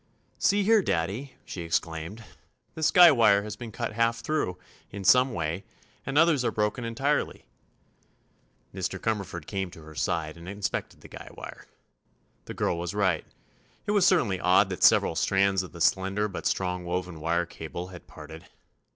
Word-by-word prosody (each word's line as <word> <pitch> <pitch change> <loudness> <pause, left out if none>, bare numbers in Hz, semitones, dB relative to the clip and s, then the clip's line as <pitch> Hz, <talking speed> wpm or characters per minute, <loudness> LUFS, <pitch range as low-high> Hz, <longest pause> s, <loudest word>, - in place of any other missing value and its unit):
"See 205 +1 +3
here, 220 +1 +5
Daddy," 105 - -2
she 90 - -6
exclaimed; 85 +5 -3 0.5
"this 160 -2 +1
guy 175 -2 +8
wire 115 -6 +4
has 105 0 -6
been 115 0 -8
cut 115 +1 -4
half 115 +1 +1
through, 115 -10 -1 0.3
in 100 0 -7
some 125 +6 +5
way, 85 +1 -3 0.4
and 135 +1 -1
others 160 -4 +4
are - - +2
broken 105 +4 -1
entirely." 135 +6 -1 1.3
Mr. 95 0 -3
Cumberford 100 -7 -3
came 95 -1 -3
to 80 -2 -13
her 80 0 -12
side 80 +1 -2
and 85 +2 -10
inspected 100 0 -4
the - - -12
guy - - -11
wire. - - -10 0.8
The - - -8
girl 85 - -1
was 85 +3 -4
right. 95 -6 +1 0.6
It - - -1
was 200 -3 +4
certainly 115 - +2
odd 95 +2 +4
that 90 - -5
several - - +5
strands 95 +3 +2
of 95 - -9
the 85 - -11
slender 95 +4 +2
but 100 - -4
strong 90 -1 -1
woven 90 -1 -4
wire 85 +2 0
cable 85 +2 -7
had 90 -2 -12
parted. 80 +2 -11
95 Hz, 170 wpm, -27 LUFS, 85-115 Hz, 1.3 s, guy